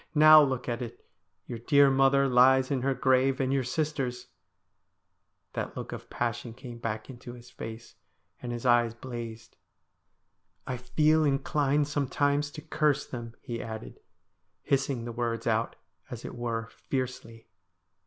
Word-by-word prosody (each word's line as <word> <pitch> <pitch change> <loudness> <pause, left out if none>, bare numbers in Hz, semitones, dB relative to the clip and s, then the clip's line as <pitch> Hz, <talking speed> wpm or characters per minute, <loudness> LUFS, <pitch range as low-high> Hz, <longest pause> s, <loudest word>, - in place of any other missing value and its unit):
Now 155 0 +9
look 130 -3 0
at 120 0 -2
it. 120 - -8 0.4
Your 120 - -6
dear 140 +3 +5
mother 135 +1 +4
lies 130 +1 +5
in 135 -3 0
her 135 +1 0
grave. 130 +1 +2
And 135 0 +1
your 135 -1 +1
sisters 125 -3 -2 0.6
' - - -50
That - - -4
look - - -6
of - - -8
passion 120 -1 -3
came 120 -2 -9
back 110 -2 -4
into 120 -2 -10
his 120 0 -13
face, 115 +1 -8 0.5
and 120 - -5
his 120 +1 -5
eyes 120 -2 +3
blazed. 120 -2 -8 0.6
' 90 +3 -48
I 130 - -3
feel 155 +6 +2
inclined 145 0 +1
sometimes 145 0 0
to 150 - -8
curse 155 -2 +1
them,' 115 -2 -7
he 115 -1 -4
added, 110 -1 -7 0.6
hissing 135 -3 0
the 120 - -4
words 115 -1 -2
out, 115 0 0 0.3
as 120 -2 -7
it - - -6
were, 115 -2 -3
fiercely. 125 -4 -5
125 Hz, 155 wpm, -28 LUFS, 120-140 Hz, 0.6 s, Now